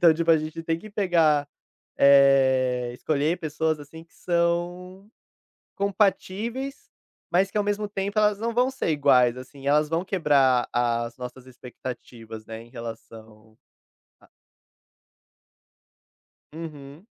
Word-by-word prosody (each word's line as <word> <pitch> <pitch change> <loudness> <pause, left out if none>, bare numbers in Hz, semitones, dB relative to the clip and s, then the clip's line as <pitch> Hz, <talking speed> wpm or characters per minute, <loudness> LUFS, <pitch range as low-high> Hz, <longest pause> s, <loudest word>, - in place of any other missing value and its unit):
então 170 -2 +8
tipo 165 +1 +1
a 165 - +7
gente 155 +1 -6
tem 165 0 -1
que 215 - -12
pegar, 165 -8 +2 0.5
eh, 130 -3 +4
escolher 155 +6 -1
pessoas 155 0 -1
assim 160 +3 -12
que 165 - -33
são 175 +3 -2 0.7
compatíveis, 210 +6 -1 0.4
mas 190 +3 +2
que 210 - -2
ao 205 - +1
mesmo 205 0 -1
tempo 200 +1 -3
elas 210 -1 +3
não 230 +2 -3
vão 250 +2 +2
ser 265 - -3
iguais, 130 -5 +3
assim, 135 +2 -11
elas 150 +1 +3
vão 165 +3 -1
quebrar 140 -9 +2
a 120 -1 +1
as 115 - -11
nossas 125 +1 -9
expectativas, 120 -3 -9
né, 110 0 -8
em 120 - -18
relação 110 -2 -11 0.6
a - - -23 2.3
Uhum. 155 0 -10
155 Hz, 130 wpm, -25 LUFS, 130-185 Hz, 2.3 s, então